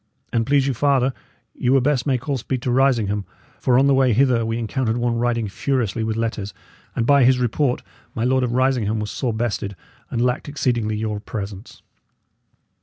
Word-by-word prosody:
"And 115 -1 +1
please 140 -1 +3
you 135 - 0
farther, 135 0 +2 0.4
ye 125 - -2
were 135 +1 +5
best 130 -1 0
make 130 -1 0
all 140 - +1
speed 130 0 -3
to 125 - 0
Risingham; 115 -6 +2 0.4
for 125 -1 +3
on 135 - +5
the 140 - +4
way 130 -2 +4
hither 125 -1 +3
we 115 0 -2
encountered 120 0 -1
one 120 -1 0
riding 120 -2 0
furiously 115 0 -1
with 110 0 -2
letters, 110 -3 -3 0.4
and 115 - 0
by 140 +1 +5
his 130 +1 +5
report, 125 +2 0 0.3
my 115 - -1
Lord 130 +1 +2
of 125 - -1
Risingham 125 -4 +1
was 105 0 -4
sore 125 -4 -2
bested, 110 -3 -2 0.3
and 120 - -2
lacked 125 +4 0
exceedingly 120 -6 0
your 105 -1 -2
presence." 100 0 -7
120 Hz, 185 wpm, -22 LUFS, 110-130 Hz, 0.4 s, were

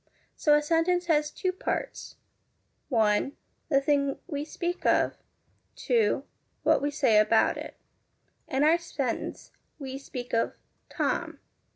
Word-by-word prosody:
So 295 -1 +4
a 295 - +2
sentence 335 +3 +2
has 300 -3 +2
two 370 +4 -2
parts: 370 - -4 0.7
(1) 220 +1 +2 0.4
The 275 -3 +4
thing 280 0 +1
we 290 -4 -3
speak 345 +3 -4
of; - - +3 0.6
(2) 455 -3 +1 0.4
What - - +4
we 285 - 0
say 265 -7 +3
about 215 +1 +4
it. - - -8 0.7
In 265 +2 +1
our 325 +3 +5
sentence, 280 -8 -4 0.3
we 270 -2 -6
speak 250 -3 -7
of 230 - +1 0.2
' - - -45
Tom.' - - -1
290 Hz, 135 wpm, -28 LUFS, 265-330 Hz, 0.7 s, our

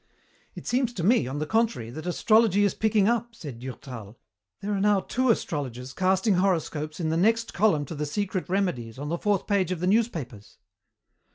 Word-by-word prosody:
"It - - -9
seems 250 -1 0
to 180 - -4
me, 205 - +3
on 135 +3 -4
the 155 - -1
contrary, 220 - 0
that 155 +6 -7
astrology 210 +2 +3
is 200 - +2
picking 215 -2 +2
up," 235 0 0
said 140 - -8
Durtal. 120 -4 -8 0.4
"There 205 +1 -3
are 195 - 0
now 205 -1 +3
two 255 +6 0
astrologers 130 - -2
casting 190 +4 +2
horoscopes 160 -5 -1
in 160 -2 -1
the 160 - 0
next 225 +5 +2
column 175 -8 +2
to 155 - -7
the 150 -1 -3
secret 185 +2 -2
remedies 175 - -1
on 145 +2 -5
the 170 +1 -2
fourth 205 -3 +1
page 195 -4 +1
of 180 - -2
the 180 - -1
newspapers." 165 - -1
185 Hz, 190 wpm, -26 LUFS, 145-210 Hz, 0.4 s, me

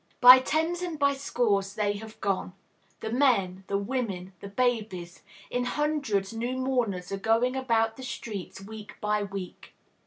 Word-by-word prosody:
By 250 +1 +11
tens 320 +6 0
and 345 -3 -3
by 280 -1 +3
scores 210 -8 0
they 205 -1 +1
have 220 +1 -10
gone, 195 -2 -1 0.5
the 220 - -4
men, 195 -8 +2
the 200 - 0
women, 200 -4 -3
the 200 - -8
babies; 210 -7 -1 0.3
in 245 0 0
hundreds 255 -8 0
new 240 +3 -2
mourners 240 -9 -1
are 195 - -1
going 225 +5 +2
about 225 -4 +1
the 260 - -8
streets, 210 -8 -6
week 215 +1 -9
by 210 0 0
week. 195 -2 -7
225 Hz, 155 wpm, -28 LUFS, 200-255 Hz, 0.5 s, By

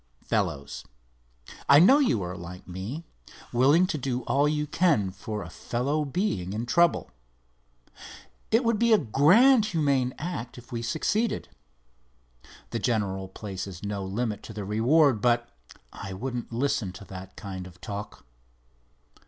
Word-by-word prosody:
Fellows, 70 +1 -2 0.9
I 140 - +9
know 210 - +7
you 175 - +2
are 90 +1 -5
like 90 0 -9
me—willing 130 - 0
to 155 -4 -3
do 125 -1 -2
all 140 +4 +2
you 150 0 0
can 150 - +2
for 105 +3 -5
a - - -9
fellow 140 +6 -1
being 135 - -2
in 110 +3 -3
trouble. 170 +7 +2 1.4
It 225 +3 +3
would 230 -2 +1
be 235 -1 +4
a - - +7
grand, 210 - +5
humane 140 -8 +1
act 150 -8 -5
if 120 +1 -13
we 115 -1 -3
succeeded. 205 - -1 1.2
The 115 - -2
general 100 -5 -1
places 95 -2 -7
no 100 -1 -3
limit 105 +2 -2
to 110 - -10
the 105 -1 -5
reward, 120 +4 +3
but 120 0 +2 0.5
I 95 -1 -7
wouldn't 120 +5 -5
listen 115 -5 0
to 95 +3 -11
that 95 0 -10
kind 95 -2 -7
of 90 0 -16
talk." 100 +2 -7
120 Hz, 140 wpm, -27 LUFS, 100-155 Hz, 1.4 s, I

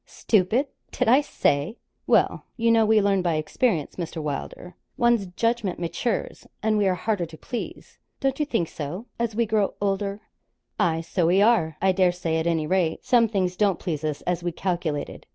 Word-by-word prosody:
'Stupid! 215 +6 +1 0.3
did 250 - -1
I 255 +5 +6
say? 150 - 0 0.3
Well, - - +2
you 230 -1 +3
know, 225 -1 +4
we 220 0 +5
learn 200 -2 +2
by 170 -3 0
experience, 155 - -1
Mr. 170 -2 -4
Wylder. 150 +4 -5 0.2
One's 235 -4 +2
judgment 220 +1 -1
matures, 180 +6 -3 0.2
and 220 0 +2
we 200 - +3
are 185 - +2
harder 180 -2 -1
to 160 0 -12
please 240 - -7 0.2
don't 270 0 -1
you 300 - +1
think 205 - 0
so? 160 +10 -6
as 230 -2 -1
we 235 +1 +2
grow 215 -2 0
older.' 200 0 -1 0.6
'Aye, 165 -1 +2
so 165 +1 0
we 180 +3 +4
are, 200 -8 +3
I 190 - +5
dare 185 -1 +3
say; 170 -2 -2
at 160 +1 -1
any 165 -2 +1
rate, 170 -1 0
some 235 -2 +4
things 185 -4 -1
don't 200 -3 +2
please 155 -4 -4
us 150 -2 -2
as 180 -1 -1
we 175 0 -2
calculated. 170 -4 -3
190 Hz, 190 wpm, -25 LUFS, 165-220 Hz, 0.6 s, I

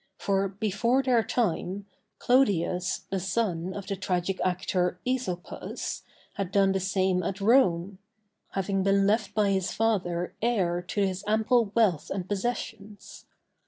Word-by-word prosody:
For 195 0 +1
before 215 +6 0
their 245 -3 +3
time, 205 -4 -1 0.3
Clodius, 190 -8 +2
the 195 - 0
son 185 -2 -1
of 200 -2 -6
the 200 - -3
tragic 185 0 -2
actor, 180 0 0
Æsopus, 250 -9 -3 0.3
had 195 -2 -4
done 195 -1 +4
the 190 - 0
same 190 -1 +1
at 185 +3 -3
Rome; 195 -5 +3 0.5
having 195 0 0
been 195 +1 +3
left 210 0 +1
by 210 -2 +3
his 190 -1 0
father 180 -6 0
heir 190 -7 +1
to 195 +3 -3
his 190 -1 -3
ample 220 0 +2
wealth 205 -10 +2
and 190 -2 -3
possessions. 210 0 -5
195 Hz, 135 wpm, -27 LUFS, 185-215 Hz, 0.5 s, done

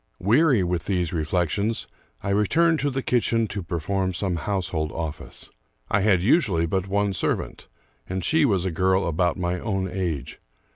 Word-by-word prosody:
Weary 120 - +3
with 90 -1 -2
these 90 -3 0
reflections, 90 +7 -1 0.4
I - - -2
returned 160 +12 +3
to 145 - 0
the 135 -1 -3
kitchen 115 -2 +1
to 100 - -4
perform 95 +2 -2
some 90 -2 -1
household 85 -4 -2
office. 80 -2 -7 0.4
I 100 - +3
had 95 -3 +3
usually 100 - +3
but 95 +3 -1
one 100 0 0
serv 85 - 0
ant, - - -11 0.4
and 95 -1 -3
she 160 0 +3
was 100 -9 +2
a 95 - 0
girl 95 +3 +2
about 85 +2 +1
my 90 0 -1
own 95 -3 -2
age. 90 -7 -4
95 Hz, 165 wpm, -24 LUFS, 85-105 Hz, 0.4 s, Weary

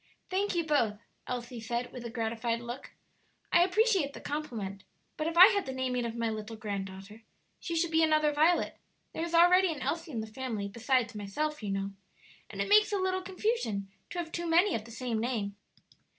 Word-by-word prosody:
"Thank 390 +1 0
you 340 - +2
both," 240 -9 +2 0.3
Elsie 245 -1 -4
said, 235 +2 -3
with 250 - -7
a - - -4
gratified 230 0 -1
look; 240 +3 -8 0.6
"I 345 - +7
appreciate 380 - +2
the - - -8
compliment; 220 -10 -4 0.3
but 310 - -2
if 335 +1 -3
I 370 +4 +11
had 400 -6 0
the 265 - -3
naming 255 -2 -1
of 230 0 -4
my 230 -1 -1
little 215 +1 -5
granddaughter, 200 0 -6 0.4
she 335 - -4
should 330 0 +1
be 320 0 +4
another 310 -1 +3
Violet; 315 +4 +2 0.3
there 325 - -3
is 340 0 -2
already 360 +2 +6
an 290 -4 -5
Elsie 335 0 -2
in 235 - -3
the - - -4
family 220 -2 -4
besides 235 +3 0
myself, 240 +10 -3
you 210 - -4
know, 195 0 -2 0.6
and - - -2
it - - -5
makes 420 +1 +5
a 410 - +1
little 375 0 0
confusion 365 - -2 0.2
to - - -7
have 335 -2 -3
too 340 +1 -3
many 345 +4 +4
of 215 - -2
the 230 - -11
same 230 -1 -2
name." 220 -5 -2
260 Hz, 200 wpm, -30 LUFS, 225-340 Hz, 0.6 s, I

